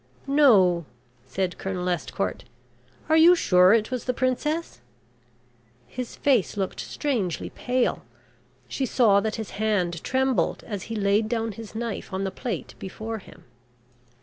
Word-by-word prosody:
"No," 200 - +4 0.4
said 180 +7 -3
Colonel 185 -2 -3
Estcourt. 160 - -2 0.6
"Are 315 - +3
you 335 +3 +7
sure 180 - +5
it 220 +2 +2
was 255 -2 -3
the 250 - -1
princess?" 300 +7 -1 1.0
His 250 -2 -7
face 250 -9 +1
looked 190 -2 -3
strangely 225 - -2
pale. 250 0 -1 0.6
She 265 - -2
saw 215 -5 +4
that 215 +1 -2
his 220 -2 -6
hand 180 -6 0
trembled 265 -1 0
as 205 -4 -5
he 225 - -3
laid 210 +1 +1
down 225 -1 -1
his 220 +1 -10
knife 230 -1 -4
on 190 +1 -2
the 190 - -2
plate 245 +3 -5
before 220 +4 -6
him. 185 -2 -16
220 Hz, 140 wpm, -25 LUFS, 190-255 Hz, 1.0 s, you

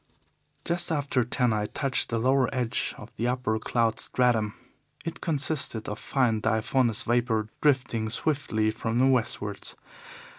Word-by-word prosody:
"Just 175 0 -1
after 140 -4 +1
ten 125 0 +1
I 105 -1 -1
touched 135 +1 0
the 115 - 0
lower 130 +2 +3
edge 125 -4 -1
of - - -11
the 120 - 0
upper 125 -3 0
cloud 115 0 0
stratum. 115 -5 +1 0.5
It 165 0 -5
consisted 145 -7 +1
of 105 - -4
fine 120 -5 +1
diaphanous 115 +1 +1
vapour 115 -2 +1
drifting 125 -6 +1
swiftly 110 -4 0
from 115 +1 -2
the 130 - +4
westwards. 110 -6 0
120 Hz, 140 wpm, -27 LUFS, 110-135 Hz, 0.5 s, the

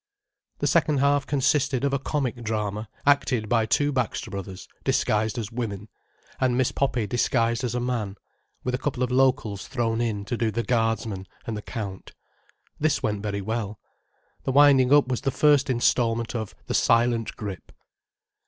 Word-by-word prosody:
The - - -2
second 150 -2 +3
half 140 0 +2
consisted 140 -2 +1
of 140 -1 +1
a 140 - +1
comic 135 -3 -2
drama 105 -1 -3 0.2
acted 130 -6 +2
by 115 -1 +2
two 145 +5 +2
Baxter 125 -7 -2
Bros., 95 -1 -7 0.2
disguised 110 +2 +1
as 115 -2 -4
women, 110 -4 -4 0.5
and 125 -2 +2
Miss 130 -1 +2
Poppy 130 -5 0
disguised 115 +2 +1
as 120 -1 -2
a - - 0
man—with 120 +1 -5
a 125 - 0
couple 130 -2 -2
of 125 - -1
locals 125 -6 +1
thrown 115 -3 -1
in 105 -4 -2
to 120 - -2
do 115 -1 0
the 115 +2 -2
guardsman 115 -5 -1 0.2
and 115 - -3
the 105 - -5
Count. 100 -5 -6 0.7
This 150 -1 +1
went 105 -2 -1
very 100 -1 -3
well. 110 0 -3 0.6
The - - -1
winding 135 -2 +6
up 145 -2 +6
was 125 -2 -2
the - - 0
first 145 -1 +3
instalment 115 -2 +1
of 110 -4 -4
"The - - -3
Silent 115 -1 +2
Grip." 100 -4 -7
120 Hz, 165 wpm, -25 LUFS, 110-130 Hz, 0.7 s, winding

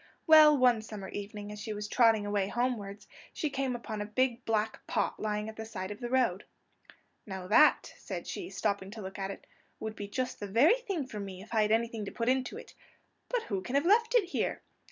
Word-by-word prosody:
Well, 310 -2 +8
one 250 -4 +4
summer 210 -3 -8
evening 205 0 -6
as 210 0 -8
she 215 - -4
was 210 0 -5
trotting 225 -3 +4
away 205 -1 0
homewards, 215 -4 -2 0.3
she 305 - -2
came 270 -2 -1
upon 220 -3 -5
a - - -2
big 245 +2 0
black 220 -1 -1
pot - - -1
lying 210 0 -2
at 220 - -8
the 220 - -5
side 190 -3 -6
of 205 - -7
the 240 - -4
road. 240 -7 +1 0.8
"Now 190 -2 -6
that," 265 +11 +4
said - - -6
she, 360 - -5
stopping 200 - -2
to 215 +1 -8
look 195 +2 -7
at 195 0 -2
it, 195 - -8 0.3
"would 220 0 -5
be 205 - -6
just 255 +5 -3
the 205 - -4
very 285 - +4
thing 390 - -3
for 220 -5 -7
me 190 -2 -7
if 220 - -12
I 220 - +4
had 210 0 +2
anything 230 -1 0
to - - -6
put 230 0 -1
into 260 0 0
it! - - -11 0.6
But - - 0
who 195 -3 -3
can 245 +8 -4
have 280 - +3
left 455 +5 +4
it 475 - +6
here?" - - -2
220 Hz, 225 wpm, -31 LUFS, 205-255 Hz, 0.8 s, Well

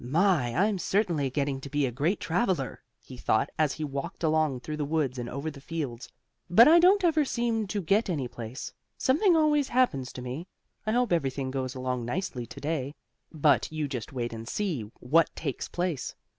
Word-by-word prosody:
"My! 150 -3 +2
I'm 200 +2 +2
certainly 170 -7 +1
getting 140 0 -1
to 140 - -7
be 145 0 +1
a 125 - -1
great 150 - 0
traveler," 175 - -1 0.2
he 130 - -11
thought 110 -2 +1
as 155 -3 +3
he 155 - -5
walked 140 +2 -5
along 155 -5 +2
through 150 +3 -5
the 150 - -1
woods 140 -4 -1
and 120 -1 -4
over 150 +3 -4
the 140 -2 -12
fields. 140 -6 -5 0.4
"But 225 +8 +8
I 330 +3 +8
don't 380 +3 +5
ever 320 -3 +4
seem 235 -5 -1
to 205 +2 -2
get 200 +7 +3
to 185 - -1
any 135 -5 -2
place. 120 +2 -7 0.2
Something 335 +7 +3
always 300 -3 +3
happens 190 - +1
to 125 - -7
me. 130 +8 -5 0.4
I - - +2
hope 245 -5 +2
everything 135 -4 -1
goes 130 -1 -3
along 130 -1 -2
nicely 125 -3 -3
to - - -10
day." 145 -2 -2 0.4
But 150 -1 +2
you 155 -2 -2
just 125 -5 -5
wait 120 -3 -3
and 115 0 -7
see 155 - -2
what 155 +6 +3
takes 140 -5 -4
place. 175 -7 -3
150 Hz, 200 wpm, -28 LUFS, 130-195 Hz, 0.4 s, But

